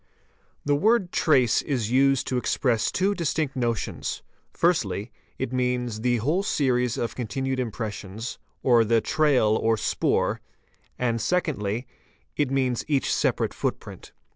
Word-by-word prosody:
The 145 - +2
word 200 +2 +2
"trace" 130 -8 +3
is 120 -7 -2
used 135 0 +3
to 130 - -1
express 125 -2 +1
two 195 +2 +1
distinct 155 -5 -1
notions, 120 -4 -2 0.3
firs - - +2 0.5
means 125 -2 -1
the 120 0 +2
whole 150 - +1
series 125 - +1
of 120 - -2
continued 130 +3 -3
impressions 110 -2 -5 0.2
or 120 -3 +5
the 115 +1 +3
"tra 155 +7 +1 0.5
'"snoor'"', - - 0 0.6
and 115 -2 0
secondly, 125 - -1 0.5
it 145 -3 +1
means 130 -3 0
each 145 -3 +1
separate - - 0
footprint. - - -5
125 Hz, 120 wpm, -25 LUFS, 115-145 Hz, 0.6 s, or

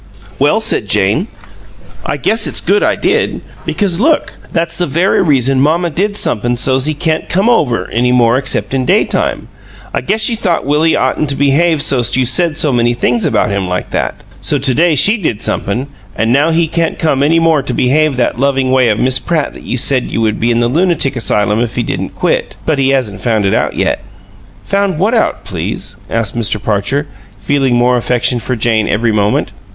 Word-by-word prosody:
"Well," - - +2
said - - 0
Jane, 105 - +1 0.8
"I - - -3
guess 225 0 +1
it's - - -1
good 200 +3 +1
I - - +2
did, 415 +6 0 0.3
because 190 -4 0
look 305 +6 +1 0.2
that's 170 +1 -2
the 175 - 0
very 170 +7 +1
reason 135 -5 +2
mamma 165 +4 +1
did 205 +6 -1
somep'm 120 - +1
so's 130 +1 +1
he 155 0 -1
can't 160 0 -2
come 195 +5 +1 0.4
any 125 +2 +1
more 120 -1 +3
except 130 0 -1
in 130 -1 0
daytime. - - 0 0.5
I - - -1
guess 215 - -1
she 230 - +1
thought 185 - -1
Willie 155 +3 +2
oughtn't 155 - 0
to 140 - +1
behave 145 +3 +2
so's't 125 -2 +1
you 130 - +2
said 165 +5 +1
so 150 -4 +1
many 120 0 +1
things 120 -1 0
about - - +1
him 100 -2 -2
like 90 0 -4
that; - - -3 0.2
so 145 - +1
to 135 -1 +1
day 165 +3 +2
she 205 - +4
did 120 - -1
somep'm, 120 +7 -1 0.3
an' 115 +2 0
now 145 +5 +3
he 165 0 +1
can't 165 +1 -1
come 150 -5 0
any 155 +4 +3
more 165 -3 +3
to 135 - -4
behave 140 +4 +1
that 120 -1 -1
loving 135 -1 +1
way 130 -2 +3
of 105 - +1
Miss 130 +2 +1
Pratt 160 -4 -2
that - - -13
you 125 - -2
said 130 +1 +1
you - - -3
would 110 -2 0
be 115 - +1
in 120 0 +1
the 120 - +2
lunatic 155 -1 +1
asylum 105 -2 0
if 120 -1 -2
he 120 - 0
didn't - - -4
quit. - - -1
But 155 -3 0
he 135 0 +2
hasn't 125 -7 -1
found 110 -4 0
it 95 - +1
out - - 0
yet." - - 0 0.6
"Found 200 -3 -1
what 200 +8 +1
out, 225 - 0
please?" - - -5
asked 115 -2 -2
Mr. 115 -1 0
Parcher, 105 +8 -1 0.3
feeling 130 +4 0
more 120 +1 +3
affection 120 +1 0
for 125 +2 -3
Jane 110 -1 +1
every 115 +2 +1
moment. 105 -1 0
135 Hz, 205 wpm, -13 LUFS, 120-165 Hz, 0.8 s, she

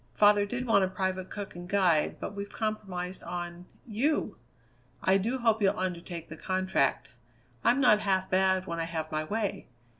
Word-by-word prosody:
Father 205 -1 +5
did 245 +4 -3
want 210 -5 +4
a - - +2
private 185 0 -2
cook 205 -3 -6
and 175 0 -8
guide, 180 -6 +2
but - - -5
we've 200 0 -5
compromised 190 -4 -3
on 175 0 -6 0.2
you! 245 0 0 0.7
I 190 +1 +4
do 235 +7 -1
hope 225 -3 +2
you'll 200 +1 +3
undertake 175 -3 -4
the 160 - -9
contract. 185 -6 0 0.5
I'm 250 - +4
not 245 -6 +6
half 190 -2 +1
bad 190 0 +2
when 170 -3 -4
I 165 - 0
have 160 -1 -4
my 155 0 -1
way. 205 +5 -2
190 Hz, 175 wpm, -29 LUFS, 180-210 Hz, 0.7 s, not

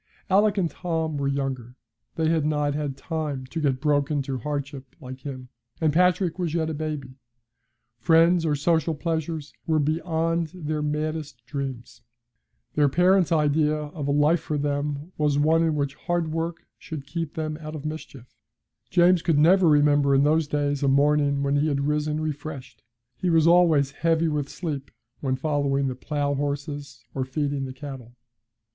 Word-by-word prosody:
Alick 205 +2 +4
and 185 -3 +2
Tom 160 -2 -3
were 140 -1 -1
younger. 135 -3 -3 0.4
They 160 -1 +1
had 160 -2 +2
not 150 -1 0
had 145 -2 -3
time 150 -5 -4
to 160 +5 -5
get 135 -3 +1
broken 145 0 +1
to 135 -1 -4
hardship 140 -1 -5
like 130 -2 -9
him, 130 -2 -8 0.3
and 155 -3 +2
Patrick 180 0 +2
was 170 -3 -1
yet 160 -1 0
a - - -3
baby. 145 -4 -5 0.8
Friends 165 +5 +4
or 155 -2 +1
social 160 +2 +1
pleasures 160 -1 -3
were 160 -1 +2
beyond 165 +1 0
their 155 -3 -3
maddest 150 -4 -3
dreams. 130 -3 -6 0.7
Their 145 -1 +3
parents' 180 +2 +3
idea 150 -1 +2
of 150 -1 -5
a - - +1
life 150 +4 +3
for 150 -1 -3
them 145 +2 -2
was 150 -2 +2
one 160 +3 +3
in 160 -2 +1
which 140 -2 -1
hard 170 0 -2
work 165 +1 -3
should 150 -4 -7
keep 165 +1 -4
them 155 -1 -3
out 155 0 -6
of 150 -1 -7
mischief. 145 -5 -7 0.6
James 175 0 +4
could 165 -3 +1
never 175 +4 +5
remember 145 -2 +4
in 135 - +4
those 155 +1 +2
days 145 -1 -1
a 140 - +2
morning 140 0 +3
when 140 +1 +1
he 145 +2 +2
had 140 -2 0
risen 150 0 0
refreshed; 145 -6 -6 0.4
he 180 - -1
was 165 -2 +4
always 165 -5 +5
heavy 165 +2 +1
with 145 -2 -2
sleep 145 -6 -5 0.3
when 130 -2 -1
following 140 -1 0
the 130 - -1
plough 145 +2 -2
horses, 145 0 -4
or 135 - -1
feeding 140 +1 -2
the 130 - -6
cattle. 130 -3 -9
150 Hz, 170 wpm, -25 LUFS, 140-160 Hz, 0.8 s, never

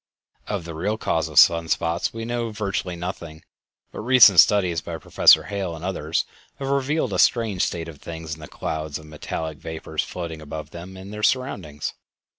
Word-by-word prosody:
Of 100 -5 -3
the 85 - -6
real 100 +7 -2
cause 80 -6 -1
of 75 - -9
sun 85 -1 +6
spots 85 +1 0
we 115 0 -6
know 120 0 -2
virtually 100 -4 -3
nothing, 85 -2 -7 0.5
but - - -8
recent 115 -5 +7
studies 90 -6 +4
by 85 0 -6
Professor - - +5
Hale 100 -5 -4
and 80 +2 -8
others 85 -4 -1 0.3
have 135 -1 -5
revealed 140 +3 0
a - - -1
strange 110 -6 +3
state 85 -1 -2
of 80 -4 -11
things 80 -1 -6
in 80 - -9
the 75 - -9
clouds 80 -1 -4
of 80 - -13
metallic 75 0 -5
vapors 80 -1 -4
floating 85 -3 -6
above 75 0 -7
them 90 +2 -9
and 95 +2 -9
their 105 - -6
surroundings. 100 - -1
85 Hz, 185 wpm, -23 LUFS, 80-105 Hz, 0.5 s, recent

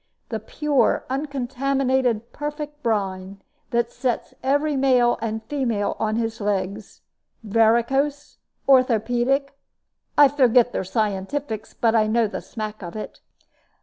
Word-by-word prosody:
The 220 - -3
pure, 290 +6 +1
uncontaminated, 265 -3 -1
perfect 295 0 -5
brine, 195 -4 -2 0.3
that 235 0 0
sets 245 -1 -2
every 285 +3 +1
male 255 -3 +3
and 220 -1 -3
female 230 -5 -1
on 215 0 0
his 225 -1 -2
legs, 200 0 -3 0.4
varicose, 235 +7 +1 0.3
orthopedic 255 +2 +3 0.6
I 290 - +9
forget 250 -3 +4
their - - -2
scientifics, 215 +4 -3
but 230 -1 +2
I 220 -2 +3
know 230 +1 +2
the 210 - -4
smack 215 -1 -6
of 175 0 -7
it." 215 - -7
235 Hz, 115 wpm, -23 LUFS, 215-275 Hz, 0.6 s, I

